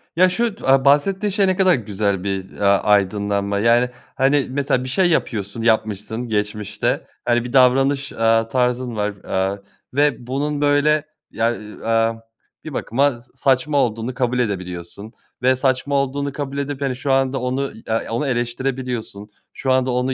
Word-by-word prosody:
Ya, 185 +2 +5
şu 220 +3 -1
d - - -14
aaa, 135 0 +4
bahsettiğin 190 +9 +3
şey 200 0 +2
ne 185 - +2
kadar 185 -2 +5
güzel 100 -5 -2
bir, 95 -1 -3
ya, 100 -1 +2
aydınlanma. 100 0 +1
Yani, 120 +3 +3 0.3
hani, 135 0 +3
mesela 135 -1 0
bir 130 - -5
şey 180 +6 +2
yapıyorsun 110 - -1
yapmışsın 110 +1 0
geçmişte, 105 -1 -2 0.2
hani, 120 0 +2
bir 125 - -7
davranış, 135 +2 +3
aaa, 115 0 +2
tarzın 125 -1 0
var, 105 0 -1
aaa, 95 +1 -1 0.4
ve 140 -4 +1
bunun 145 +3 -2
böyle, 145 +1 +3 0.3
ya, 115 +1 0
iii, 105 0 -11
amm, 115 0 +1 0.4
bir 155 - -7
bakıma 130 0 0
s 120 - -26
saçma 140 +2 +1
olduğunu 115 -1 0
kabul 125 0 0
edebiliyorsun 95 -1 -4 0.3
ve 130 +1 +4
saçma 130 +2 0
olduğunu 140 +1 0
kabul 140 -1 -5
edip, 140 0 -3
hani, 135 -2 -1
şu 135 +2 -2
anda 135 0 +2
onu, 130 +2 -1
i 110 - -14
ya, 110 0 0
onu 125 +5 -1
eleştirebiliyorsun. 120 -3 -3 0.2
Şu 135 - -2
anda 130 0 +2
onu, 125 +1 0
125 Hz, 165 wpm, -20 LUFS, 110-140 Hz, 0.4 s, Ya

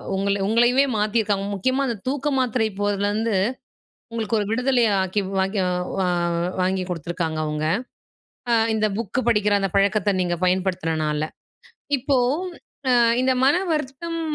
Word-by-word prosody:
உங்க 200 +1 -1 0.2
உங்களயவே 240 +5 +4
மாத்தியிருக்காங்க. 210 -2 0
முக்கியமா 255 +8 0
அந்த 235 -4 -2
தூக்க 280 +2 -1
மாத்திரை 245 -3 +1
போடறதுலருந்து, 205 +2 0 0.8
உங்களுக்கு 225 0 -1
ஒரு 205 - -1
விடுதலைய 245 -1 +2
ஆக்கி, 190 +2 -1 0.2
வாக்கி 195 +2 0 0.4
வா 185 - +1 0.5
வாங்கி 185 0 +1
குடுத்துருக்காங்க 165 -1 -3
அவுங்க! 150 0 -2 0.8
அ - - +3 0.2
இந்த 215 -1 +2
புக்கு 230 +2 -2
படிக்கிற 210 -3 +3
அந்த 195 -1 -1
பழக்கத்த 200 0 +2
நீங்க 175 -1 -1
பயன்படுத்துனனால! 165 -5 0 0.8
இப்போ, 275 +1 +1 0.7
அ - - +4 0.3
இந்த 260 0 +3
"மன 280 +5 +5 0.2
வருத்தம்" 310 +3 -3
210 Hz, 125 wpm, -23 LUFS, 190-245 Hz, 0.8 s, மன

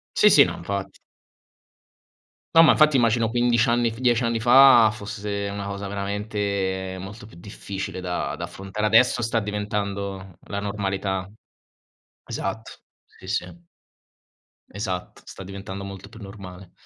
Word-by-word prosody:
Sì, - - +6
sì, - - +8
no, - - -3
infatti. 100 -1 -5 1.6
No, 165 - +9
ma 160 - +7
infatti 155 -2 +4
immagino 115 -2 +2
15 120 0 +2
anni 120 0 +2
f 115 - -10
10 120 -2 +2
anni 115 -1 0
fa 120 -1 +7
fosse 100 -1 -5
una 100 0 -5
cosa 100 0 -5
veramente 100 -2 -3
molto 105 +3 -9
più 95 - -16
difficile 95 +1 -7
da 90 -1 -3
da - - -4
affrontare. 95 +2 -5
Adesso 120 +3 +4
sta 115 0 0
diventando 100 -2 -4
la 100 - -3
normalità. 95 -2 -3 1.0
Esatto. 110 +3 -5 0.5
Sì, - - -13
sì. 170 - -4 1.1
Esatto, 95 -2 -5
sta 95 - -10
diventando 100 0 -7
molto 100 0 -9
più 115 +1 -14
normale. 95 -3 -11
100 Hz, 135 wpm, -24 LUFS, 95-115 Hz, 1.6 s, No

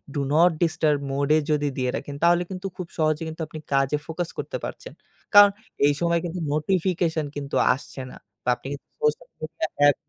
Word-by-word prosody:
do 145 - 0
not 170 +3 +6
disturb 155 -3 +2
mode 140 +2 0
এ - - +5
যদি 145 -1 +1
দিয়ে 125 -1 0
রাখেন 145 - -5
তাহলে 175 +1 +5
কিন্তু 190 0 -5
খুব 180 -3 -5
সহজে 155 0 +1
কিন্তু 160 +1 -7
আপনি 155 - -8
কাজে 135 +1 +2
ফোকাস 165 +1 -3
করতে - - -3
পারছেন। - - -8 0.4
কারণ 205 0 +10 0.4
এই 145 - +4
সময় 170 0 +2
কিন্তু 175 +1 -4
নোটিফিকেশন 165 -1 0
কিন্তু 140 -1 -4 0.2
আসছে 135 0 -8
না। - - -11 0.3
তা - - -15
আপনি 125 - -11
কিন্তু 140 - -10
সোশ্যাল 455 +2 +1
মিডিয়া 155 0 -3
অ্যাপ। 145 0 +5
160 Hz, 190 wpm, -25 LUFS, 145-175 Hz, 0.4 s, কারণ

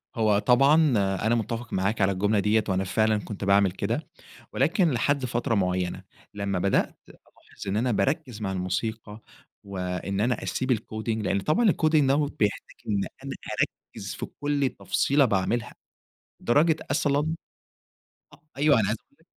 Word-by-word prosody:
هو 110 -3 +3
طبعًا 135 +6 +5 0.4
أنا 110 +5 +1
متِّفق 115 +1 -4
معاك 100 +4 0
على 95 0 +3
الجملة 100 +3 +1
دِيّة 105 +2 +2
وأنا 95 0 +1
فعلًا 110 +3 +1
كنت 105 -1 -6
باعمل 100 -1 +4
كده، 110 - -3 0.5
ولكن 165 +5 +2
لحد 140 +2 0
فترة 120 0 -1
معينة، 90 -3 -1 0.3
لما 100 -2 -2
بدأت 95 +2 +1
ألاحظ - - -13
إن 95 - -1
أنا 120 +3 +1
باركّز 135 -1 -1
مع 95 -2 -2
الموسيقى 105 +4 -3 0.4
و 100 -1 -7
إن 90 +2 -3
أنا 120 +3 0
أسيب 130 0 -1
الcoding 110 +1 -4
لأن 100 -1 0
طبعًا 205 - +3
الcoding 155 -3 +3
دَوّة 135 - +4
هو 150 - +1
بيحتاج 105 -7 -2
إن 100 -2 +1 0.2
أنا 135 - -5 0.6
أركّز 100 0 -6
في - - -5
كل 145 -1 -1
تفصيلة 140 +1 +2
باعملها، 110 +1 0 0.7
لدرجة 150 +6 +3
أصلًا 145 +2 +1 1.0
أ - - -15 0.2
أيوه 145 -3 +4
أنا 105 - +1
عايز 110 - 0 0.2
أقول - - -31
لَك - - -27
110 Hz, 160 wpm, -26 LUFS, 100-135 Hz, 1.0 s, طبعًا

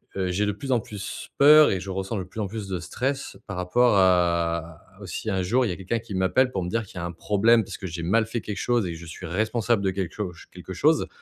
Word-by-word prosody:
heu, 95 -1 -1
j'ai 100 +4 +1
de 105 - +1
plus 130 +6 -5
en 125 - +4
plus 105 -3 -7
peur, 150 +1 +8
et 95 - 0
je 95 - -7
ressens 95 +3 -3
de 95 - -3
plus 90 +5 -10
en 100 - -1
plus 105 0 -6
de 95 -2 -2
stress 135 +10 -3
par 95 -3 -5
rapport 105 +6 +3
à 85 -3 +2 0.2
au 100 - -7
si 110 - -4
un 95 - 0
jour, 120 +8 +2
il - - -1
y - - -1
a - - -3
quelqu'un 95 +6 -2
qui 110 -2 -9
m'appelle 125 +8 +2
pour 95 -5 -2
me 90 - -3
dire 115 +3 -1
qu'il 95 - -17
y - - -4
a 85 - -3
un 85 - -4
problème, 110 +6 +3
puisque 95 0 -7
j'ai 85 0 -5
mal 110 +6 +2
fait 115 0 -3
quelque 105 -1 -5
chose 120 -4 +1
et 85 - -4
que - - -8
je 85 - -10
suis 80 +3 -8
responsable 110 +4 0
de 95 - +2
quelque 95 -3 -3
cho 100 -4 -4 0.2
quelque 90 +1 -8
chose, 155 - +2
95 Hz, 285 wpm, -25 LUFS, 90-115 Hz, 0.2 s, peur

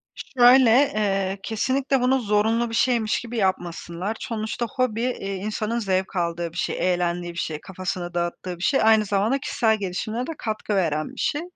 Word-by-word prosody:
Şöyle, 250 -1 +5
eee, 205 -6 +2
kesinlikle 260 +4 0
bunu 260 +2 +3
zorunlu 225 +1 +1
bir 225 - -4
şeymiş 235 -3 +2
gibi 235 0 -6
yapmasınlar. 185 0 -2
Sonuçta 220 +1 -3
hobi, 250 -4 0
eee, 215 -6 -2
insanın 215 +4 -2
zevk 190 -3 -1
aldığı 170 -1 -1
bir 170 - -11
şey, 180 0 0
eğlendiği 175 0 -2
bir - - -12
şey, 155 -3 -3
kafasını 185 -2 -5
dağıttığı 175 +1 -3
bir 175 - -8
şey. 270 +7 +3
Aynı 220 -1 +5
zamanda 205 +6 +1
kişisel 220 -4 +1
gelişimine 215 +5 -3
de - - -3
katkı 215 -1 -3
veren 155 -5 0
bir - - -11
şey. 295 - 0
210 Hz, 170 wpm, -24 LUFS, 180-235 Hz, -, Şöyle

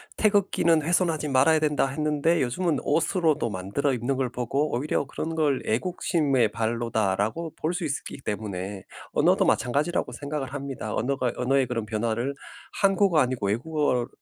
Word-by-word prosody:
"태극기는 195 -6 +3
훼손하지 165 -2 +1
말아야 140 +4 +4
된다." 150 -2 +1
했는데 150 +3 +1
요즘은 145 +4 0
옷으로도 155 - +1
만들어 100 +9 -1
입는 125 +3 -1
걸 130 -1 -1
보고 135 +5 -1
오히려 145 +5 0
그런 160 +4 -4
걸 145 -4 +1
'애국심의 140 - +1
발로다.'라고 115 - -1
볼 155 - -2
수 175 -1 -3
있기 140 -1 -4
때문에 100 -2 -4 0.3
언어도 - - +3
마찬가지라고 145 +8 +1
생각을 145 -2 -5
합니다. 140 -2 -5
언어가 130 -2 0
언어의 130 0 +2
그런 115 -3 -2
변화를 115 +5 -1 0.5
한국어 195 -4 +4
아니고 125 -5 0
외국어를 125 +1 0
140 Hz, 375 characters per minute, -26 LUFS, 120-155 Hz, 0.5 s, 말아야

